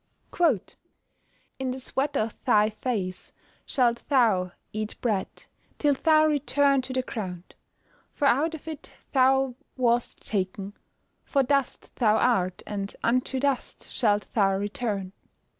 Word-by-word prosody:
[Verse: 305 - +1 0.8
"In 265 -1 -2
the 255 +1 -3
sweat 270 +2 -1
of 220 0 -3
thy 210 +1 +4
face 210 -5 -3 0.4
shalt 240 -3 +1
thou 215 -10 +3 0.2
eat 215 0 -4
bread, 210 -6 0 0.5
till 290 -1 +3
thou 310 +2 +4
return 285 -2 +3
to 255 +1 -6
the 255 0 0
ground; 185 -7 -6 0.6
for 290 - -2
out 310 +6 +2
of 315 - -12
it 315 -3 -7 0.2
thou 265 -1 +3 0.2
wast 240 -1 0
taken: 195 0 -2 0.5
for 275 -2 +1
dust 275 0 -1
thou 220 -3 +4
art, 185 -7 +1
and 200 -1 -4
unto 255 +2 +1
dust 275 -1 -2
shalt 210 -4 +2
thou 195 -3 +3
return." 200 -1 -2
245 Hz, 130 wpm, -26 LUFS, 205-270 Hz, 0.8 s, thy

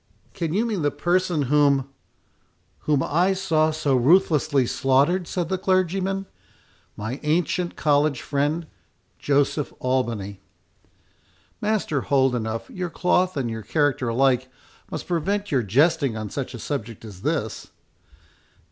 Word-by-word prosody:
"Can 165 -4 -3
you 210 +7 +1
mean 215 -6 -2
the 145 - +2
person 175 -2 0
whom"— 140 -1 +3 1.0
"Whom 145 -3 +2
I 180 +6 +2
saw 165 -5 +1
so 150 -3 0
ruthlessly 145 -1 +3
slaughtered," 140 +9 +2
said 175 -3 -2
the 190 +1 -2
clergyman—"My 185 - -3
ancient 170 +3 0
college 145 -2 +1
friend—Joseph 145 -1 -2
Albany." 115 -6 -2 1.2
"Master 210 -9 0
Holdenough, 125 -5 0
your 180 -1 -4
cloth 180 +1 +1
and 130 -3 -1
your 115 -1 -4
character 135 +2 0
alike 130 +1 +2 0.4
must 155 - -5
prevent 195 +4 -1
your 135 -3 +2
jesting 140 - +2
on 110 -2 -5
such 135 -2 -4
a - - -6
subject 115 -3 -5
as 100 -4 -11
this." - - -2
145 Hz, 120 wpm, -24 LUFS, 130-175 Hz, 1.2 s, whom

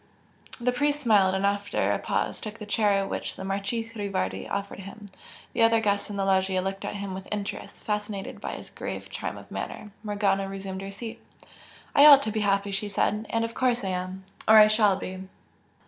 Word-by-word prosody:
The 245 +1 +1
priest 290 +3 +1
smiled 205 -8 +4
and 190 +1 0
after 200 0 +1
a - - 0
pause - - -2
took 215 +1 -6
the 210 - -7
chair 205 -2 +2
which - - -4
the - - -7
Marchese 200 +4 -2
Rivardi 200 -3 -2
offered 200 -1 -3
him. 200 +2 -10 0.4
The - - 0
other 225 0 +5
guests 205 -2 0
in 205 - -5
the 195 -1 0
loggia 190 -1 +2
looked 195 +1 -3
at - - -4
him 200 -1 -4
with 190 0 -7
interest, 205 -1 -5
fascinated 210 -2 -3
by - - -4
his - - -9
grave - - -6
charm - - -4
of - - -13
manner. 210 - -6
Morgana 200 -2 0
resumed 195 -1 -5
her 195 - -6
seat. 220 +3 -7 0.7
"I 285 +1 +8
ought 280 -2 +9
to 215 - -2
be 215 - -1
happy" 200 -1 +1
she 195 +2 -2
said 210 +2 0
"And 230 0 +1
of 230 - -6
course 245 -2 +1
I 190 - -1
am 185 +1 -4 0.2
or 220 - +8
I 215 - +10
shall 215 -2 +4
be!" 185 0 -6
205 Hz, 205 wpm, -27 LUFS, 195-220 Hz, 0.7 s, I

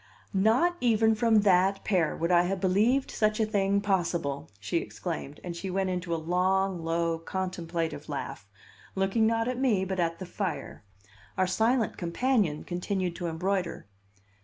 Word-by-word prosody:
"Not 230 - +3
even 225 -2 +3
from 220 -1 +3
that 195 0 +3
pair 180 -7 +1
would 170 +2 0
I 175 -1 +6
have 190 +1 -1
believed 215 +9 +2
such 215 0 +1
a 220 - +3
thing 200 -2 +1
possible!" 170 -8 -1
she 100 +11 -1
exclaimed; 160 -4 -5
and 175 -1 -5
she 190 +3 -5
went 190 0 0
into 180 -1 -3
a - - +2
long, 180 +2 0
low, 165 0 0
contemplative 165 -4 -4
laugh, 135 -8 -5 0.5
looking 195 +4 +2
not 225 0 +1
at 250 0 -2
me, 220 -8 +2
but 190 0 -3
at 165 -1 0
the 185 - -6
fire. 185 - -4 0.5
Our 190 - +3
silent 225 +5 +1
companion 180 - 0
continued 180 0 -2
to 175 -1 -3
embroider. 180 +1 -2
190 Hz, 160 wpm, -28 LUFS, 170-210 Hz, 0.5 s, I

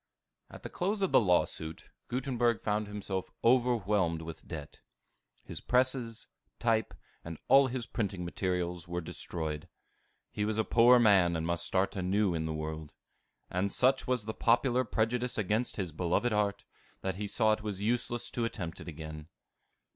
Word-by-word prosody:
At - - -12
the - - -5
close 200 +3 -1
of 190 - +1
the - - +7
lawsuit, 90 -5 0 0.2
Gutenberg 120 -2 0
found 105 0 0
himself 100 -2 -4
overwhelmed 105 -9 +2
with 80 0 -9
debt. 75 -4 -8 0.6
His - - -7
presses, 125 -2 0 0.3
type, 115 -3 0 0.3
and 85 -1 -7
all 135 0 +7
his 125 -2 -3
printing 100 -7 -3
materials 90 -1 -2
were 85 0 -3
destroyed. 80 -2 -4 0.6
He 105 - -2
was 110 +1 -1
a 110 - +2
poor 120 +3 +6
man, 100 -7 +5
and 80 0 -2
must 85 0 +1
start 95 +3 0
anew 95 +1 +1
in 80 -1 -2
the - - -2
world. 80 -1 -5 0.6
And 95 +2 0
such 130 +1 +2
was 125 -4 0
the 110 - -3
popular 125 +2 +2
prejudice 120 +2 -1
against 110 +4 0
his 95 -5 -3
beloved 90 +9 0
art, 100 -1 0 0.4
that 95 -1 -3
he 105 0 -3
saw 110 +1 +2
it 110 - -3
was 105 -2 -4
useless 120 +1 0
to 120 - -2
attempt 90 -8 -4
it - - -10
again. 80 -1 -8
105 Hz, 160 wpm, -31 LUFS, 85-120 Hz, 0.6 s, the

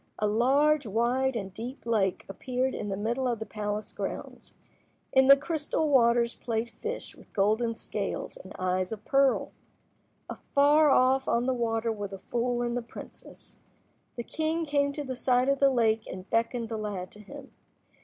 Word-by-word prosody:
A 215 - 0
large, 270 +6 +3
wide, 245 +5 +1
and 195 -4 -4
deep 240 +6 -7
lake 210 -5 0
appeared 255 +6 -2
in 205 - -4
the 195 - -2
middle 235 +5 -1
of 240 -2 0
the 220 - -5
palace 210 0 -4
grounds. - - -6 0.6
In 265 0 +5
the 275 0 +9
crystal 310 +1 -1
waters 235 -3 +4
played 230 0 -3
fish 465 +2 -6
with - - -18
golden 220 +3 +1
scales - - -4
and - - -12
eyes 185 0 -1
of 215 -1 -7
pearl. 275 -1 +2 0.8
Afar 295 +2 +3
off 265 0 +3
on 235 +1 +1
the 260 - +1
water 230 -1 0
were 205 -2 -4
the 195 0 -8
fool 240 +4 -1
and 240 0 -2
the 245 - -1
princess. 230 - -12 0.6
The 235 - -4
king 320 +5 -2
came 285 -1 +1
to 295 - -4
the 260 -2 -5
side 250 +1 +2
of 275 -1 +2
the 275 - +5
lake 225 -4 +1
and 185 +1 -8
beckoned 230 0 0
the 225 - -3
lad 195 -4 -4
to 210 - -13
him. 275 +6 -11
240 Hz, 175 wpm, -28 LUFS, 220-270 Hz, 0.8 s, the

